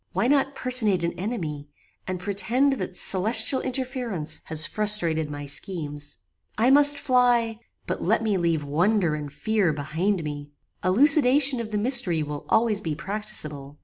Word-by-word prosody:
Why - - -1
not 275 0 +1
personate 220 -8 +3
an 170 - -2
enemy, 165 -7 -6 0.4
and 185 -1 -4
pretend 205 +9 0
that 185 -1 -6
celestial 220 +7 +3
interference 245 - -3
has 160 -1 -2
frustrated 170 -8 0
my 145 0 -7
schemes? 145 -1 -3 0.4
I 235 +4 +3
must 290 +1 +5
fly, 245 -4 +1 0.3
but - - -4
let - - 0
me 215 -3 0
leave 165 -3 -1
wonder 175 +4 0
and 150 -2 -6
fear 210 +2 -1
behind 160 +6 -2
me. 145 -1 -7 0.3
Elucidation 275 - +4
of 230 -2 -5
the 210 - -3
mystery 205 - +3
will 145 -1 -7
always 220 -2 +1
be 160 -5 -4
practicable. 155 -7 -5
195 Hz, 145 wpm, -24 LUFS, 155-240 Hz, 0.4 s, must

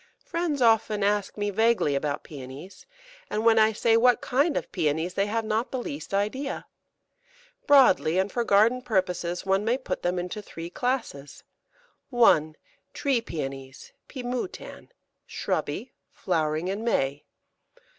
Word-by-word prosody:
Friends 335 -6 -1
often 220 -2 +3
ask 205 0 0
me 205 0 -1
vaguely 220 -7 +2
about 140 +1 -2
Pæonies, 140 +5 -10 0.4
and 215 +2 -2
when 225 -1 +6
I 220 0 +5
say, 225 +1 +2
"What 245 +1 +4
kind 285 +5 +1
of - - -4
Pæonies?" 160 0 -1
they 195 +2 0
have 225 +1 -1
not 220 +3 -1
the 260 - -3
least 285 +2 -6
idea. 215 +8 -2 1.0
Broadly, 255 - +5
and 190 +2 +1
for 240 - 0
garden 230 +4 +3
purposes, 180 -6 -1
one 195 +1 +2
may 235 +4 +1
put 260 - -4
them 180 +1 -1
into 180 +4 -4
three 170 -3 -9
classes 225 - -3 0.7
1. 160 - +4 0.4
Tree 270 -5 +1
Pæonies 135 -6 -7 0.2
(P. 260 -3 -7
moutan), 250 +8 -5 0.4
shrubby, - - -3 0.2
flowering 155 +1 -1
in 200 +3 -3
May. 140 -11 0
205 Hz, 140 wpm, -26 LUFS, 170-240 Hz, 1.0 s, when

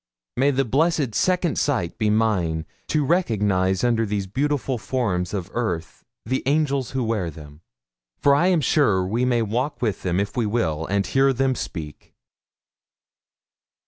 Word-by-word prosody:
May 135 +4 +3
the 135 -1 +1
blessed 145 0 +1
second 180 - +1
sight 120 - -1
be 110 -2 +2
mine 95 -8 +1 0.2
to 150 -2 +1
recognise 105 - +1
under 115 -2 +2
these 100 -2 -2
beautiful 135 +3 -1
forms 95 -9 -1
of 95 -2 -4
earth 90 -10 -3 0.2
the 130 +4 -1
ANGELS 140 -3 +1
who 130 -1 -2
wear 110 -6 -1
them; 75 0 -12 0.6
for 140 - +4
I 170 +6 +3
am 180 -4 +3
sure 115 - +2
we 115 +6 0
may 120 -2 +2
walk 120 +7 -2
with 110 -5 -1
them 90 0 0
if 100 0 -2
we 120 -4 0
will, 80 -8 -1
and 100 0 0
hear 135 0 +3
them 135 +1 +1
speak! 80 - -7
115 Hz, 155 wpm, -23 LUFS, 95-135 Hz, 0.6 s, for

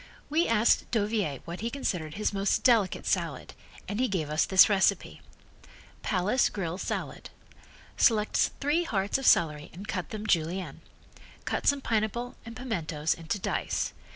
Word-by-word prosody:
We 325 +3 +2
asked 230 0 +3
Dauviller 205 - -1
what 170 +2 -6
he 230 - -2
considered 180 - -3
his 210 0 -1
most 195 0 0
delicate 225 -7 +3
salad - - -2 0.3
and 205 - -3
he 255 - +2
gave 160 -8 -2
us 155 - +2
this 190 -1 +7
recipe: 200 -2 +1 0.8
Palace 205 +6 +1
Grill 180 -3 -4
Salad - - -4 0.7
Select 215 -3 +3
three 295 +5 +1
hearts 200 - -1
of 270 - -1
celery 150 -3 +3
and 195 +5 -10
cut 185 -5 -3
them 215 -1 -6
Julienne. 175 0 -1 0.6
Cut - - -2
some 285 -1 +3
pineapple 230 +1 -1
and 230 - -8
pimentoes 165 - -2
into 165 +6 -4
dice. 190 - -2
205 Hz, 150 wpm, -28 LUFS, 175-230 Hz, 0.8 s, this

